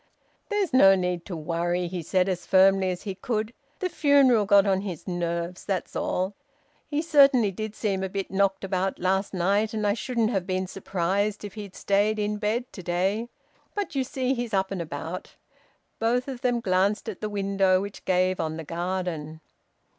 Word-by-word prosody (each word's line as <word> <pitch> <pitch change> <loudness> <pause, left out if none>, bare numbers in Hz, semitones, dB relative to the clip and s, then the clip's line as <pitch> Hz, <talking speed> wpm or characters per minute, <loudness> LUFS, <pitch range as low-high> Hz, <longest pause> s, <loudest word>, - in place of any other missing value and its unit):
"There's 415 - 0
no 195 -7 +7
need 180 -2 -2
to 180 - -5
worry," 175 +3 -1
he 175 0 -4
said 180 +3 +1
as 185 -2 -3
firmly 190 0 +5
as 180 -1 -4
he 195 - -3
could 215 +3 -3 0.2
"The 370 - -1
funeral 275 - +4
got 200 -1 +6
on 190 -1 +2
his 185 -6 -6
nerves, 175 0 -3
that's 190 -3 -3
all. 185 +2 -1 0.5
He 295 +1 -1
certainly 275 -9 +5
did 215 +3 -5
seem 195 -3 -1
a 190 - -2
bit 195 0 -4
knocked 195 0 +1
about 190 0 -1
last 190 +2 0
night, 200 +4 +1
and 215 -1 -1
I 205 - +3
shouldn't 235 -1 -1
have 190 -4 -1
been 185 0 -1
surprised 195 +2 -1
if 200 - -8
he'd 205 -3 -8
stayed 205 +2 +1
in 210 0 -1
bed 220 +4 -1
to 185 - -8
day. 190 +7 -1 0.5
But 410 -1 -3
you 270 -2 +1
see 260 0 -1
he's 240 -4 -2
up 190 0 0
and 190 -3 -2
about." 160 +3 -6 0.6
Both 245 +3 +1
of 260 -3 -6
them 245 -2 +1
glanced 195 +2 +1
at 215 -4 -6
the 215 - -2
window, 195 -2 +2
which 200 +1 -7
gave 185 0 +1
on 160 0 -2
the 160 - -5
garden. 170 -2 -3
195 Hz, 185 wpm, -26 LUFS, 185-215 Hz, 0.6 s, no